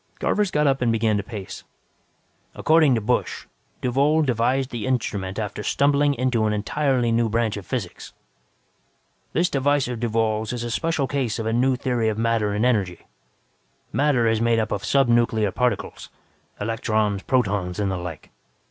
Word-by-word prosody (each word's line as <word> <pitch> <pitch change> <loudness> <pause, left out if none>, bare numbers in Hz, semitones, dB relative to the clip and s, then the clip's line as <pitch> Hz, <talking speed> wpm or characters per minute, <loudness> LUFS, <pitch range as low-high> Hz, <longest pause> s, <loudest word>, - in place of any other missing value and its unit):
Garvers 210 -2 +1
got 150 -3 +1
up 135 -2 +2
and 120 -2 +2
began 110 -1 +1
to - - -1
pace. 100 -2 -8 0.9
"According 155 -4 +4
to 115 - -1
Busch, 125 +4 -1 0.4
Duvall 140 +5 +2
devised 130 +1 0
the 115 -2 -4
instrument 100 -6 -2
after 105 -1 -4
stumbling 140 +4 +2
into 125 -3 +1
an 105 - 0
entirely 125 +3 0
new 115 0 +2
branch 115 -1 0
of 100 -3 -8
physics. 110 -9 -5 1.2
"This 175 +2 +2
device 145 -2 +1
of 125 -2 -4
Duvall's 110 -1 0
is 120 -1 -4
a 120 - -4
special 160 +1 0
case 130 -5 -2
of 110 - -4
a 110 - 0
new 130 +2 +2
theory 120 -3 0
of 110 - -3
matter 115 -2 +1
and 105 +3 0
energy. 100 -8 0 0.9
Matter 140 -5 +2
is 110 0 +1
made 115 0 +2
up 110 -1 -1
of 100 - -2
subnuclear 115 -4 +2
particles 125 -1 -2 0.5
electrons, 110 -2 -1
protons 100 -8 0
and 100 -2 0
the 95 - -2
like. 85 -4 -8
115 Hz, 165 wpm, -23 LUFS, 110-130 Hz, 1.2 s, According